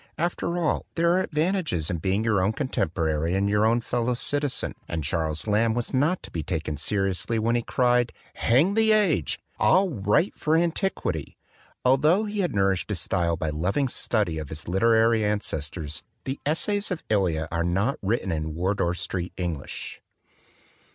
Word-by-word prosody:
After 170 +1 -1
all, 170 -3 0
there 170 +1 +3
are 185 - +3
ad - - -4
vantages 155 - 0
in 85 - -2
being 95 +5 0
your 105 -4 +2
own 100 +4 +1
contemporary 80 - -1
and 100 +1 +1
your 105 +1 +3
own 120 +1 +2
fellow 120 +1 -1
citizen; 145 +2 -1
and 80 -2 -3
Charles 80 0 -1
Lamb 110 +1 +2
was 120 +2 -3
not 150 +8 +1
to - - -10
be 80 - -3
taken 80 -1 -3
seriously 95 +7 -1
when 115 +2 +1
he 120 - +2
cried, 125 0 +2 0.2
"Hang 140 - +3
the 220 0 +4
age! 185 - +2 0.2
I'll 185 - +4
write 105 - +1
for 155 +1 +1
antiquity 165 - -1 0.2
!" - - -32
Altho 150 +10 +4
he 210 -1 -4
had 175 - 0
nourished 95 -1 +1
his 100 -5 -1
style 85 -1 0
by 80 -2 -2
loving 95 - 0
study 105 -9 -1
of 75 -3 -6
his 80 0 -7
literary 115 +4 +3
ancestors, 80 -7 -2 0.2
the 135 +1 -4
l - - +3
Essays 205 +5 -1
of 180 -4 -5
EhV 90 -7 +1
are 85 0 0
not 95 +10 0
written 100 -1 -1
in 80 -1 -3
Wardour 90 0 0
street 90 0 -4
English. 85 -6 -5
105 Hz, 175 wpm, -25 LUFS, 85-145 Hz, 0.2 s, the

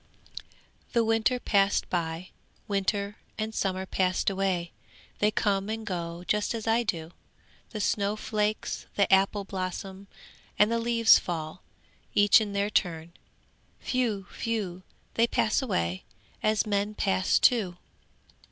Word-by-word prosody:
'The 235 - +3
winter 225 +3 +2
passed 200 -3 +2
by; 170 0 -3 0.4
winter 200 0 -1 0.2
and 220 0 -3
summer 190 -2 -1
passed 185 +1 0
away! 185 -3 -1 0.5
They 210 - +4
come 205 -2 0
and 220 0 -4
go 170 -2 -4
just 210 +2 0
as 225 - -5
I 225 +1 +3
do. 170 -7 -3 0.6
The 215 - -6
snow 200 0 +1
flakes, 215 0 -2
the 200 -1 +3
apple 195 +1 +3
blossom, 190 +1 -5 0.5
and 210 +2 +4
the 230 - +1
leaves 230 -1 +5
fall, 160 0 -5 0.5
each 205 +2 +6
in 205 -2 -3
their 200 +1 0
turn. 170 -3 -1 0.7
Whew! 230 -7 -1 0.2
whew! 205 -6 -2 0.3
they 230 +1 +3
pass 225 +2 +1
away, 90 - -1 0.4
as 215 +1 +2
men 205 0 -1
pass 190 -2 +2
too! 200 -8 +3
200 Hz, 130 wpm, -28 LUFS, 185-220 Hz, 0.7 s, each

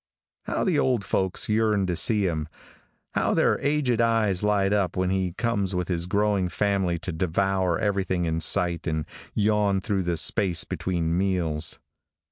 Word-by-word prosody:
How - - -1
the 175 -7 +1
old 125 -6 +1
folks 95 -1 0
yearn 105 -2 +2
to 90 -1 -1
see 105 +2 +2
him. 80 -4 -2 0.7
How - - +1
their - - +2
aged 140 -5 +1
eyes 110 -5 +2
light 105 -1 +1
up 100 -4 0
when 95 0 0
he 95 -2 -1
comes 100 -4 -1
with 90 0 -2
his 85 -1 -1
growing 100 -2 +1
family 95 -3 0
to 90 +2 -5
devour 90 +1 0
everything 95 -4 -1
in 80 0 -1
sight 85 -1 +1
and 80 -2 -1 0.3
yawn 105 -2 +2
through 95 0 -1
the 85 -2 -1
space 90 +1 +2
between 85 -3 -2
meals. 85 -4 0
95 Hz, 160 wpm, -25 LUFS, 90-105 Hz, 0.7 s, yearn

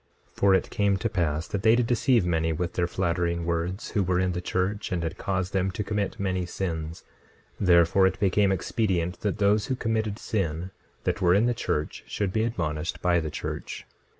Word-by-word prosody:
26:6 - - -35
For 100 -1 +5
it 95 - 0
came 100 -1 +2
to 115 +4 -1
pass 80 -5 -1
that 100 -2 -3
they 110 +2 +5
did 120 0 +2
deceive 120 -2 +2
many 80 -2 +1
with 85 +2 -2
their 85 -1 0
flattering 85 -1 -1
words, 85 +4 -2
who 105 - +1
were 90 -1 +1
in 95 0 +1
the 90 0 -3
church, 95 +3 -2
and 85 -2 -1
did 85 +2 -4
cause 95 -1 -1
them 95 -1 +1
to 95 +3 -3
commit 105 0 -2
many 95 -2 -1
sins; 80 -3 -4 0.6
therefore 90 +1 +5
it 95 - -3
became 100 0 +3
expedient 90 -2 -1
that 105 -2 -1
those 105 +1 +2
who 130 - 0
committed 110 -3 -1
sin, 90 -5 -2 0.3
that - - -1
were 90 0 +5
in 105 +4 +4
the 120 - +2
church, 75 -9 -3
should 100 -3 -2
be 110 - +1
admonished 85 -8 -2
by 90 -1 +3
the 80 -2 -3
church. - - -5
95 Hz, 205 wpm, -26 LUFS, 85-100 Hz, 0.6 s, For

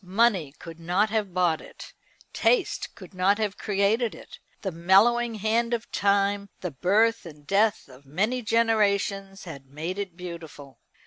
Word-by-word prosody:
Money 190 -5 +2
could 165 -1 -11
not 180 +6 +1
have 215 -4 -1
bought 175 -3 +1
it. - - -12 0.4
Taste 460 -8 0
could - - -13
not 190 +2 +2
have 210 -2 -2
created 210 +3 +1
it. - - -13 0.2
The 190 - -2
mellowing 220 +8 +3
hand 230 +3 +1
of 230 - -8
time, 200 0 +1
the 180 - -3
birth 215 - +2
and 150 -4 -12
death 205 +5 +1
of 130 +1 -16
many 210 - -1
generations, 200 -4 +1
had 140 -6 -10
made 160 +8 -5
it 190 -4 -5
beautiful. 165 -6 -9
195 Hz, 150 wpm, -26 LUFS, 170-220 Hz, 0.4 s, mellowing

